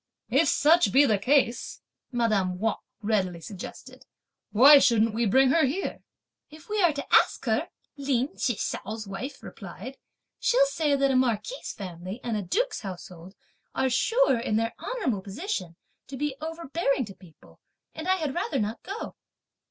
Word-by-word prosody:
"If 285 +6 +4
such 300 - +4
be 275 +6 +6
the 215 -6 +2
case," 250 +1 +1 0.3
madame 215 -7 +1
Wang 220 +3 0 0.3
readily 190 -5 0
suggested, 190 +3 -10 0.5
"why 275 +7 +8
shouldn't 230 -4 +3
we 230 +1 +1
bring 260 +5 +4
her 325 +2 +4
here?" 345 +9 -3 0.5
"If 310 +3 -15
we 425 -1 0
are 345 -3 +5
to 280 - -5
ask - - +4
her," - - 0 0.3
Lin 270 -1 0
Chih 245 - 0
hsiao's 215 +2 -4
wife 200 +8 -7
replied, 210 +6 -9 0.4
"she'll - - +4
say 315 -12 0
that 275 0 +2
a - - +1
marquis' 255 - -1
family 185 +1 -7
and 235 -2 -2
a 210 - -1
duke's 450 - -1
household 180 -2 -9 0.4
are 265 -1 +1
sure, 450 - +3
in 230 -2 -1
their 225 +1 0
honourable 255 - -2
position, 195 - -5 0.3
to 270 - -7
be 295 0 -2
overbearing 320 -4 -1
to 200 - -10
people; 180 -4 -19 0.3
and 315 +2 -7
I 375 - +4
had 310 -7 -3
rather 320 -4 -2
not 215 +1 -3
go." 400 +4 -6
255 Hz, 160 wpm, -27 LUFS, 205-295 Hz, 0.5 s, why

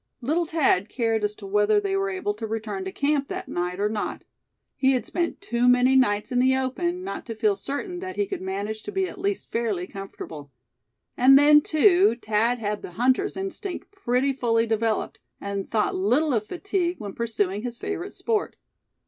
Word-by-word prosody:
Little 310 +8 0
Thad 280 - +2
cared 225 -3 0
as 210 0 -1
to 205 - -11
whether 210 - +3
they 395 -1 -1
were 390 0 0
able 375 - -2
to 220 +2 -6
return 210 -3 -4
to 190 - -4
camp 285 +2 0
that - - -5
night 180 +1 -3
or 205 - +2
not. 210 0 -3 0.5
He 265 0 +3
had 255 - -1
spent 345 +2 -2
too 245 -11 +2
many 250 +1 +5
nights 210 -5 +2
in 250 - +2
the 260 +1 +4
open, 345 +8 -2
not 385 - -5
to 225 - -5
feel 215 -2 +2
certain 285 - -4
that 370 0 -6
he 410 - +1
could 390 -1 -5
manage 200 +3 -4
to - - -7
be 385 -1 0
at 375 - -10
least 400 0 -2
fairly 215 -6 -1
comfortable. 175 -7 -9 0.7
And 270 +2 +7
then, 295 +1 +7
too, 350 - +4
Thad 225 +2 +1
had 210 -2 -3
the 180 - -9
hunter's 255 - +1
instinct 385 0 -5
pretty 275 -8 0
fully 230 -3 +1
developed, 225 -1 -1 0.2
and 200 -1 -4
thought 215 -2 +1
little 255 +10 +2
of 215 -2 0
fatigue 360 -1 -1
when 205 -3 -7
pursuing 210 -4 -1
his 240 0 -5
favorite 395 +1 -5
sport. 445 -2 -1
245 Hz, 190 wpm, -25 LUFS, 210-345 Hz, 0.7 s, And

